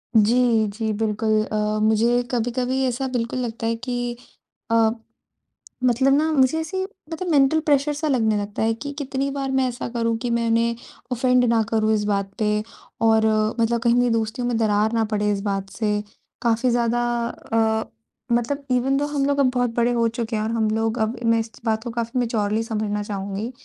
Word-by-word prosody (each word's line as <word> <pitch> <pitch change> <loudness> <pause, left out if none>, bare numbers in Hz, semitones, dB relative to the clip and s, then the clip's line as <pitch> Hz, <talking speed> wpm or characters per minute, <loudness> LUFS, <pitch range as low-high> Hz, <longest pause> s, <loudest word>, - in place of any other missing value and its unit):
जी, 225 0 +4
जी 220 +2 -3
बिल्कुल। 215 0 +1
अ, 215 0 -1
मुझे 225 +3 +3
कभी-कभी 250 +2 0
ऐसा 255 +2 -2
बिल्कुल 245 -1 -2
लगता 230 -2 -3
है 230 - +1
कि 245 0 -3 0.5
अ, 225 -1 +4 0.9
मतलब 255 +2 +3
ना 310 +3 +2
मुझे 270 +2 +3
ऐसी 350 +4 -3 0.3
मतलब 360 +3 -4
मेंटल 285 +2 +4
प्रेशर 290 0 +2
सा 310 +2 -2
लगने 225 -6 +2
लगता 205 +1 -3
है 225 0 +2
कि 285 +5 -6
कितनी 275 0 -2
बार 275 -1 -3
मैं 265 -1 +2
ऐसा 245 0 -4
करूँ 230 -1 0
कि 245 - -1
मैं 235 0 0
उन्हें 230 +1 +2 0.4
ऑफ़ेंड 250 0 +3
ना 230 -1 +3
करूँ 220 -1 +2
इस 210 -1 +1
बात 200 -1 -1
पे 215 -1 +2 0.5
और 220 -1 +4 0.3
मतलब 230 0 +1
कहीं 235 0 +3
मेरी 245 0 +3
दोस्तियों 225 +2 -1
में 240 - 0
दरार 215 0 +2
ना 225 -1 +2
पड़े 210 0 +1
इस 200 -1 -1
बात 195 -1 -2
से। 210 0 -1 0.4
काफ़ी 235 +1 +2
ज़्यादा 240 0 +1 0.3
अ, 220 -1 -1 0.5
मतलब 275 +4 -2
इवेन 265 +2 +2
थो 290 - +1
हम 290 -2 -1
लोग 285 0 +1
अब 265 -2 +4
बहुत 245 -2 0
बड़े 240 0 +2
हो 230 -1 +2
चुके 230 0 -3
हैं 215 - -1
और 220 - -2
हम 225 -2 +1
लोग 225 +2 0
अब 220 +2 0
मैं 230 0 +3
इस 225 0 -4
बात 220 -1 0
को 240 - -5
काफ़ी 235 +1 -2
मैच्योरली 220 -2 0
समझना 210 -2 -2
चाहूँगी 200 +2 -4
230 Hz, 195 wpm, -23 LUFS, 220-250 Hz, 0.9 s, जी